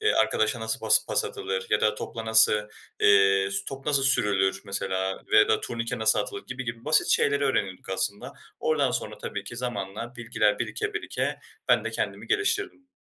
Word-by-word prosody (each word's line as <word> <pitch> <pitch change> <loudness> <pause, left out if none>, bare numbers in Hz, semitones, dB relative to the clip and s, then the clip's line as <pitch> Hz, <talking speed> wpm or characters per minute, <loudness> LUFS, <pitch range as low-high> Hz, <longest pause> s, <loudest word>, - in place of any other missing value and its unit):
eee, 435 0 +3
arkadaşa 120 - +1
nasıl 110 0 -2
pas - - +4
pas - - +1
atılır 95 0 -4
ya 105 - +3
da 105 0 +2
topla 115 +1 -6
nasıl, 110 0 +6 0.5
eee, 100 -1 +5
s 95 0 -2
top 135 0 -8
nasıl 140 -2 +2
sürülür 95 -7 +2
mesela 95 -1 -2
ve - - +7
ya 105 - +5
da 110 - +2
turnike 115 -1 -4
nasıl 110 0 +3
atılır 105 - -4
gibi 125 +1 -6
gibi 115 0 -6
basit 155 +1 +3
şeyleri 140 0 +2
öğrenirdik 100 -10 -1
aslında. 100 +7 -3 0.3
Oradan 145 -4 +1
sonra 110 -3 -4
tabii 100 - -5
ki 120 +4 -8
zamanla 115 -1 -4
bilgiler 110 -3 0
birike 430 -1 -3
birike 430 - -3 0.3
ben - - +4
de - - -2
kendimi - - -4
geliştirdim. 405 -8 -1
110 Hz, 185 wpm, -26 LUFS, 100-135 Hz, 0.5 s, ve